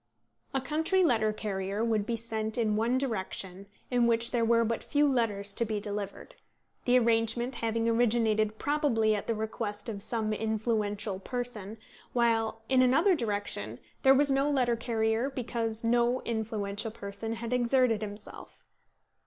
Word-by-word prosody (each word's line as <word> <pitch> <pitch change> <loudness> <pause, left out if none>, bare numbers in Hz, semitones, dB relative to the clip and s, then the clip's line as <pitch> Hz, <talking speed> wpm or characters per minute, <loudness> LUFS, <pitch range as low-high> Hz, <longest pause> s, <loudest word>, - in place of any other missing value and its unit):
A 270 - 0
country 320 +8 +1
letter 220 -9 +3
carrier 200 0 -2
would 220 -3 0
be 235 - 0
sent 220 -1 -2
in 220 -3 +1
one 230 +4 +1
direction 195 -6 -4 0.2
in 245 -1 +3
which 230 0 +3
there 240 -2 +1
were 230 0 +3
but 230 0 -2
few 295 0 +2
letters 210 -6 0
to 235 - -1
be 215 -2 -2
delivered, 205 -1 -6 0.5
the 250 0 +5
arrangement 235 +1 +1
having 230 0 0
originated 220 -2 +2
probably 280 -7 +1
at 205 - -3
the 230 - 0
request 215 0 -4
of 200 -3 -5
some 215 0 -2
influential 215 -2 -1
person, 225 -2 -5 0.4
while 225 -2 +1
in 260 -1 +4
another 320 +10 +4
direction 205 - -3 0.2
there 270 0 +6
was 280 +1 +3
no 275 +2 +2
letter 250 -4 +2
carrier 225 +1 0
because 230 -4 -3
no 240 +2 +2
influential 220 -2 -2
person 210 +1 -5
had 230 +1 -4
exerted 245 -2 +3
himself. 205 0 -9
225 Hz, 150 wpm, -29 LUFS, 215-245 Hz, 0.5 s, there